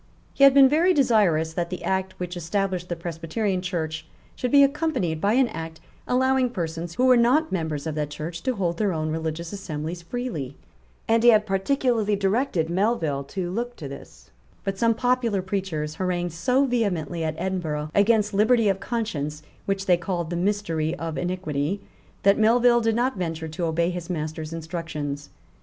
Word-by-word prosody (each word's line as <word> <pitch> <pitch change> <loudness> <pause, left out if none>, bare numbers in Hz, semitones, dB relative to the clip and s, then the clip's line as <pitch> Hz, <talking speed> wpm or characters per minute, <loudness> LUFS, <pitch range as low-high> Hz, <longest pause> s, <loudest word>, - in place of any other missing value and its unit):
He 275 - +2
had 275 0 +7
been 275 -1 +9
very 330 +6 +3
desirous 195 - +3
that 170 0 -2
the 180 - -6
Act 190 0 -2
which 180 0 -4
established 180 +1 -2
the 175 - -1
Presbyterian 170 +4 -2
Church 160 -3 -3 0.3
should 250 - -2
be 280 +2 +7
accompanied 275 - 0
by 205 +2 +2
an 260 +1 +4
Act 160 0 -7 0.3
allowing 260 0 +2
persons 170 -5 -4
who 255 - +2
were 255 -1 +7
not 255 +7 +3
members 160 -5 -2
of 160 - -2
that 150 -1 -2
Church 165 +3 -6
to 255 +5 -1
hold 175 -4 -1
their 205 -3 +1
own 155 -1 -2
religious 160 +2 -4
assemblies 170 -3 -5
freely; 170 - -4 0.5
and 225 0 +3
he 240 - +7
had 215 -2 +5
particularly 215 +1 +1
directed 195 - 0
Melville 170 -6 0
to 175 +3 -4
look 240 +4 -3
to 145 - -7
this, 65 - -12 0.3
But 195 0 -3
some 230 -1 +3
popular 240 -5 +1
preachers 185 -6 -3
harangued 175 -1 -2
so 250 +11 +2
vehemently 180 - -1
at 155 -1 -2
Edinburgh 155 -5 -3
against 210 0 +3
liberty 220 +2 +4
of 195 -1 0
conscience, 155 -10 -3 0.2
which 195 0 -1
they 180 -2 +4
called 170 -1 -3
the - - -1
mystery 170 -4 -1
of 165 -2 -5
iniquity, 180 -1 -2 0.4
that 200 +2 +4
Melville 240 +2 +5
did 225 -1 +1
not 245 -1 0
venture 160 -3 -3
to 170 +3 -3
obey 170 +2 +1
his 175 0 -6
master's 155 -1 -4
instructions. 160 -3 -5
185 Hz, 175 wpm, -24 LUFS, 160-225 Hz, 0.5 s, been